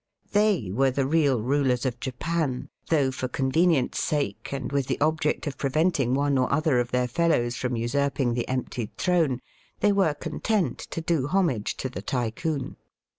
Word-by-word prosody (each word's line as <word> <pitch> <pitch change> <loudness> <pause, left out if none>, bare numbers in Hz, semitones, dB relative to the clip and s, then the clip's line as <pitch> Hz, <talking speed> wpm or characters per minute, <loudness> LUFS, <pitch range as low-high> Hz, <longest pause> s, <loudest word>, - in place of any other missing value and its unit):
21 210 +1 +4 0.2
They 90 - -5
were 135 +6 +3
the 130 +1 0
real 140 -4 +3
rulers 130 -1 +1
of 120 -2 -2
Japan, 140 +1 -2 0.2
though 145 -5 +3
for 130 0 -3
convenience' 135 +2 +1
sake, 150 -2 -2
and 140 -1 -4
with 140 -2 0
the - - -1
ohject 155 0 +1
of 145 -3 -5
preventing 140 -2 +1
one 140 -1 +2
or 125 - +1
other 150 -3 +2
of 120 -1 -1
their 125 0 +1
fellows 120 -4 +1
from 125 0 -2
usurping 130 +1 0
the 120 0 -2
emptied 125 -3 -3
throne, 165 -8 +2 0.4
they 205 - +4
were 190 -7 +2
content 170 - -1
to 165 - -5
do 160 -5 0
homage 155 - 0
to - - -2
the 130 - -6
Tycoon. 130 +4 -2
140 Hz, 175 wpm, -26 LUFS, 125-160 Hz, 0.4 s, 21